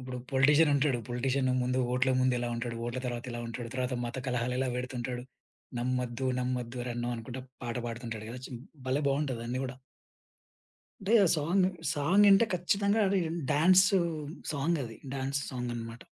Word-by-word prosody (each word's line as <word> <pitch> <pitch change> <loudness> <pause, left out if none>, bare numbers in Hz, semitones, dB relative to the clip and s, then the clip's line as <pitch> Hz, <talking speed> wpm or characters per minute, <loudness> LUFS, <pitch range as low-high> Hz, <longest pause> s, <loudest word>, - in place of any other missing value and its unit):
ఇప్పుడు 125 0 -6
పొలిటీషియన్ 145 +4 +5
ఉంటాడు. 140 -3 +2
పొలిటీషియన్ 130 +2 0
ముందు 125 +1 0 0.2
ఓట్ల 130 +1 +2
ముందు 130 -1 +3
ఎలా 120 0 -2
ఉంటాడు? 115 0 -3
ఓట్ల 120 +2 -3
తర్వాత 120 -1 -4
ఎలా 120 - -4
ఉంటాడు? 115 +1 -5
తర్వాత 130 0 -1
మత 120 +2 -5
కలహాలు 125 0 0
ఎలా 130 - +1
పెడుతుంటాడు 125 -1 -4 0.5
నమ్మొద్దు 125 +1 -1
నమ్మొద్దు 125 -1 -2
ఓరన్నో! 120 0 -3
అనుకుంట 120 +3 -7 0.3
పాట 120 0 -3
పాడుతుంటాడు 115 -2 -5
కదా! 125 +1 -7
చ్ - - -11 0.4
భలే 135 +3 +1
బావుంటదన్నీ 130 -3 -1
కూడా! 125 -1 -5 1.3
అంటే 200 +4 0 0.2
సాంగ్, 175 +5 +2 0.3
సాంగ్ 180 +8 +4
ఇంటే 195 +3 +7
ఖచ్చితంగా 200 +4 +2
రి 195 - +3
అది 170 +1 -3
డాన్సు 185 +5 +5 0.5
సాంగ్ 155 +3 0
అది. 115 -3 -7 0.2
డాన్స్ 135 +1 -1
సాంగనమాట. 120 -2 -5
130 Hz, 150 wpm, -30 LUFS, 120-145 Hz, 1.3 s, ఇంటే